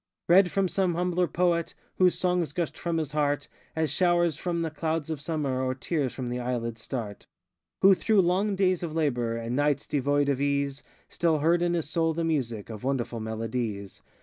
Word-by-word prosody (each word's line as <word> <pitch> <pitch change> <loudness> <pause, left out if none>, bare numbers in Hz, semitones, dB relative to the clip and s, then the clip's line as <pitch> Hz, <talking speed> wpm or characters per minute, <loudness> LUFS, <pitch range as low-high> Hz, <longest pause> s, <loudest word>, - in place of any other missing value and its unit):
Read 180 +2 +6
from 195 +2 +1
some 180 -2 0
humbler 180 0 +1
poet, 170 -1 0 0.2
Whose 185 -1 +4
songs 180 -3 0
gushed 170 -2 -2
from 170 -1 -2
his 155 -2 -2
heart, 145 -1 0 0.3
As 160 -1 0
showers 175 -3 +3
from 170 +1 -2
the 160 - -2
clouds 160 0 -2
of 150 -3 -4
summer, 145 -4 -1
Or 130 0 -1
tears 140 -1 -1
from 125 -2 -5
the 125 +1 -3
eyelids 115 -2 -3
start; 115 -5 -6 0.6
Who 195 +1 +9
through 210 +2 +3
long 190 +3 +1
days 185 -2 +2
of 165 -3 -4
labor, 120 -7 0
And 115 +1 -3
nights 145 0 +1
devoid 145 0 +1
of 140 -1 0
ease, 140 -1 0 0.3
Still 165 -2 +1
heard 165 +4 +2
in 175 0 +1
his 165 -3 -2
soul 165 +1 0
the 165 - -1
music 120 -10 -2
Of 110 0 -8
wonderful 125 -3 -2
melodies. 110 -2 -4
155 Hz, 190 wpm, -27 LUFS, 130-175 Hz, 0.6 s, Who